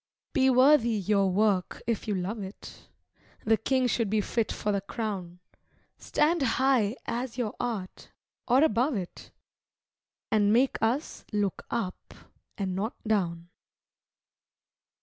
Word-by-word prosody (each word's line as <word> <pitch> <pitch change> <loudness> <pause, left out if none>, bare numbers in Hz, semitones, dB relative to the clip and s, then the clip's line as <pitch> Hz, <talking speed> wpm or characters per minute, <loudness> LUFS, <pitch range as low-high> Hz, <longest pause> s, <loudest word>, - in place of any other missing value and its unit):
Be 265 -3 +4
worthy 260 -1 +5
your 200 0 +2
work 195 -1 +1
if 230 -1 -2
you 210 - 0
love 195 +4 -3
it; 195 +1 -10 0.6
The 225 - +5
king 255 +4 +1
should 230 -3 0
be 215 +1 +2
fit 220 +2 -1
for 210 - -2
the 200 -1 0
crown; 195 -5 -5 0.6
Stand 325 +2 +1
high 255 -3 +2
as 245 +1 -3
your 235 -4 -2
art, 220 -7 -4 0.4
or 255 +4 +5
above 250 +1 +2
it, 185 -4 -6 1.0
And 210 -1 +3
make 250 +4 +3
us 245 +8 -1
look 205 -3 -2
up 225 -6 -4 0.4
and 190 -2 -2
not 215 +6 -2
down. 175 -5 -1
220 Hz, 130 wpm, -28 LUFS, 200-245 Hz, 1.0 s, worthy